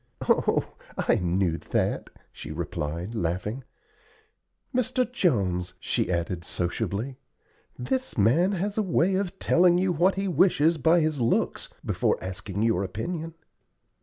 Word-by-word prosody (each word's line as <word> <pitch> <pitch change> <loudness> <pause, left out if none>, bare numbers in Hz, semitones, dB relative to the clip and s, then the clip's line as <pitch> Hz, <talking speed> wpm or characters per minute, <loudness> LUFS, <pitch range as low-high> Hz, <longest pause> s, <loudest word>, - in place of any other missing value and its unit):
"Oh, - - +2 0.2
I - - +2
knew 90 -1 0
that," - - -1 0.2
she - - -9
replied, 85 +4 -4
laughing. 105 +6 -2 1.1
"Mr. 255 0 +1
Jones," 95 - 0
she - - -1
added, 85 0 -2
sociably, 100 +9 -3 0.6
"this 260 - -2
man 150 - +4
has 200 +3 -1
a - - +4
way 190 -1 +2
of 190 0 -1
telling 175 -1 +4
you 185 0 +2
what 175 +4 +3
he 195 +1 -1
wishes 165 -2 +3
by 165 +5 +4
his 155 -4 0
looks 115 - 0 0.2
before - - +1
asking 95 +2 -4
your 115 -4 +2
opinion." 160 - -4
130 Hz, 130 wpm, -26 LUFS, -, 1.1 s, man